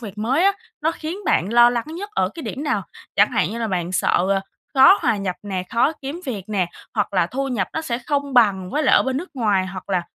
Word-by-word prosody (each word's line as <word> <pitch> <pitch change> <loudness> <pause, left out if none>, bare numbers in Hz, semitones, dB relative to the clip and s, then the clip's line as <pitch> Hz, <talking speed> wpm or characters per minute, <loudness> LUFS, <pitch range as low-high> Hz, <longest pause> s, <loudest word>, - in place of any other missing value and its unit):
việc 210 -3 -9
mới 265 - +1
á, 395 - +5 0.3
nó 315 +2 +1
khiến 330 +4 -6
bạn 190 - +1
lo 240 0 +7
lắng 235 -1 -2
nhất 355 +7 -7
ở 185 - +1
cái 330 - -7
điểm 280 - -5
nào, 300 - 0 0.3
chẳng - - +5
hạn - - 0
như 230 - -5
là 230 - -1
bạn 180 -1 -2
sợ, 185 0 +2
ờ, 195 -1 +2 0.3
khó 270 +9 +7
hòa 245 -7 +2
nhập 195 -3 -3
nè, 190 -3 -3
khó 240 +6 +2
kiếm 280 +6 -5
việc 210 -8 -4
nè, 195 -4 0 0.3
hoặc 205 -2 -1
là 180 -3 +3
thu 270 +8 -3
nhập 220 -8 -1
nó 320 - -2
sẽ 240 -7 -2
không 280 +1 -2
bằng 195 -6 +3
với 300 - 0
lại - - +4
ở - - +4
bên 265 -1 -2
nước 350 +7 -5
ngoài 205 -6 +1
hoặc 185 0 -8
là 185 -3 +1
235 Hz, 260 wpm, -21 LUFS, 195-280 Hz, 0.3 s, lo